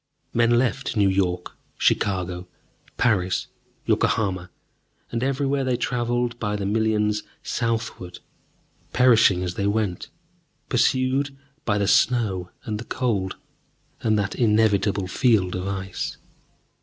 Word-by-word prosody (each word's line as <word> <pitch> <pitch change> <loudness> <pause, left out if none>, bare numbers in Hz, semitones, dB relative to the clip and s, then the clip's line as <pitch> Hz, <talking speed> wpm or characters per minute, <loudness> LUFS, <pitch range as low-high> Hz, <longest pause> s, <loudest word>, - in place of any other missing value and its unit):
Men 120 0 +4
left 130 0 0
New 100 -2 +4
York, 90 -2 -1 0.2
Chicago, 90 -2 0 0.5
Paris, 95 -6 +1 0.4
Yokohama, 95 -4 +1 0.6
and 115 - -2
everywhere 135 +1 0
they 130 -2 0
traveled 120 0 -1
by 105 -2 -1
the 100 -1 -3
millions 105 0 +1 0.2
southward, 115 -6 -3 0.8
perishing 115 -7 +5
as 90 -1 -3
they 100 +2 -1
went, 100 -4 -1 0.6
pursued 130 +3 +1 0.3
by 100 - +1
the 100 -1 +1
snow 100 -8 +2
and 105 -2 -3
the 120 - -7
cold, 105 -7 -1 0.7
and 110 -1 +2
that 100 -1 -1
inevitable 105 -3 +2
field 95 -2 +2
of 90 +1 -3
ice. 95 -1 -4
105 Hz, 115 wpm, -24 LUFS, 95-120 Hz, 0.8 s, perishing